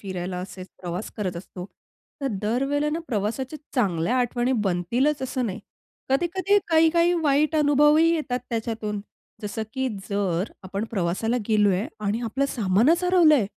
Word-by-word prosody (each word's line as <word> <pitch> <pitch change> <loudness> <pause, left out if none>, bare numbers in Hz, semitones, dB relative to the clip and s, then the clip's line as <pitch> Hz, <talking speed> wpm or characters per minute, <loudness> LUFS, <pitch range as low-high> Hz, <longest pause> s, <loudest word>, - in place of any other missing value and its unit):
फिरायला, 185 -2 -4
असेचं 185 0 -8
प्रवास 180 +4 -4
करत 185 -4 -3
असतो. 180 0 -8 0.6
तर 275 - -1 0.2
दर 240 +5 +1
वेळेला 290 +2 0
ना 320 - -1
प्रवासाच्या 240 +6 -2 0.2
चांगल्या 200 - +1
आठवणी 245 +1 +1 0.2
बनतीलचं 245 - 0
असं 255 -1 -2
नाही. 190 - -5 0.5
कधी-कधी 350 +8 +2
काही-काही 335 +1 +4
वाईट 300 +1 +2
अनुभवही 295 +2 +5
येतात 275 -6 -1
त्याच्यातून, 220 -2 -3 0.4
जसं 210 +2 -3
की 265 -1 0 0.2
जर 195 -1 -1
आपण 195 +3 -4
प्रवासाला 195 +5 0
गेलो 210 -2 +4
आहे 195 +7 -1 0.2
आणि 210 +3 0
आपलं 255 +5 0
सामानचं 240 - +2
हरवलं 350 -4 +6
आहे. 235 -9 +2
235 Hz, 145 wpm, -25 LUFS, 195-295 Hz, 0.6 s, हरवलं